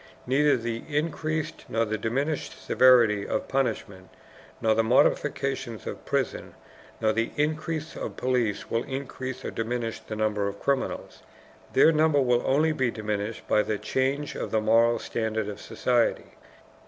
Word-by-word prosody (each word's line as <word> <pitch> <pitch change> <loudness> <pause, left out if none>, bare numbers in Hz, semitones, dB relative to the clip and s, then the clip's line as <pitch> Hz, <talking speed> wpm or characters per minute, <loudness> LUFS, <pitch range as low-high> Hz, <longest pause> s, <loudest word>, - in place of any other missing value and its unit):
Neither 145 +3 +3
the 115 -1 -4
increased 155 +1 -2
nor 115 +1 +1
the 110 0 -2
diminished 135 +8 -2
severity 115 -6 +4
of - - -2
punishment, 100 -8 -2 0.5
nor 110 -1 +3
the 115 +1 +2
modifications 130 -1 +1
of - - -7
prisons, - - -2 0.4
nor 110 -1 +2
the 115 +1 0
increase 155 +1 -2
of - - -6
police 125 -5 0
will 115 - +1
increase 130 -1 -5
or - - -3
diminish 115 0 -3
the 110 - -7
number 105 -2 0
of 100 0 -5
criminals. 140 -2 -2 0.5
Their 160 - +6
number 155 -2 +3
will 125 -2 +3
only 155 +4 +3
be 130 -5 +1
diminished 105 -1 -4
by 105 - +4
the 105 0 -2
change 135 +6 -1
of - - -4
the 110 - +1
moral 115 +2 +4
standard 110 -1 -2
of 105 - -6
society. 120 -2 0
120 Hz, 150 wpm, -26 LUFS, 110-140 Hz, 0.5 s, Their